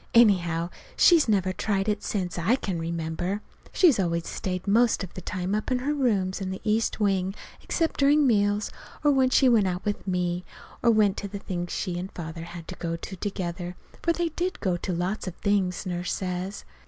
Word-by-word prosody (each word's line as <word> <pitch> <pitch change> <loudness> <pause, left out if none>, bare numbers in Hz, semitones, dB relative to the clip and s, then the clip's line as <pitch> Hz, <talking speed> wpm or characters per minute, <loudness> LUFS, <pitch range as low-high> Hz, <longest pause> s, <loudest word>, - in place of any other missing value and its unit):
Anyhow, 175 -7 +4 0.3
she's 330 -8 +6
never 190 -3 +2
tried 195 +1 -1
it 210 -1 0
since 180 -4 -2
I 195 +9 +3
can 190 -9 -3
remember. 170 +4 -3 0.3
She's 320 - +5
always 170 -2 0
stayed 185 -1 -3
most 225 +1 +3
of 185 - -8
the 185 - -7
time 185 +1 -3
up 215 0 -1
in 255 - +2
her 275 +4 -1
rooms 205 -10 +1
in 190 - -2
the 190 - -4
east 220 +1 +1
wing, 195 -2 +1 0.3
except 330 -2 -1
during 290 +1 +5
meals, 205 -3 +2 0.3
or 295 - +5
when 265 -2 +4
she 265 +1 +5
went 225 -5 +5
out 180 0 -3
with 205 -1 -2
me, 180 -1 0 0.4
or 240 - +4
went 210 -3 +4
to 205 - -3
the 200 +1 -6
things 175 -3 -4
she 175 -3 -2
and 185 +2 -5
Father 165 -1 -6
had 170 -1 -9
to 185 - -5
go 165 -1 -2
to 180 +3 -7
together. 180 -2 -4 0.3
For 340 - +2
they 340 0 0
did 355 +3 -3
go 185 -4 0
to 180 +2 -3
lots 180 +4 -2
of 180 - -4
things, 200 -2 0
Nurse 180 -1 -2
says. 185 +1 -3
195 Hz, 205 wpm, -26 LUFS, 180-215 Hz, 0.4 s, she's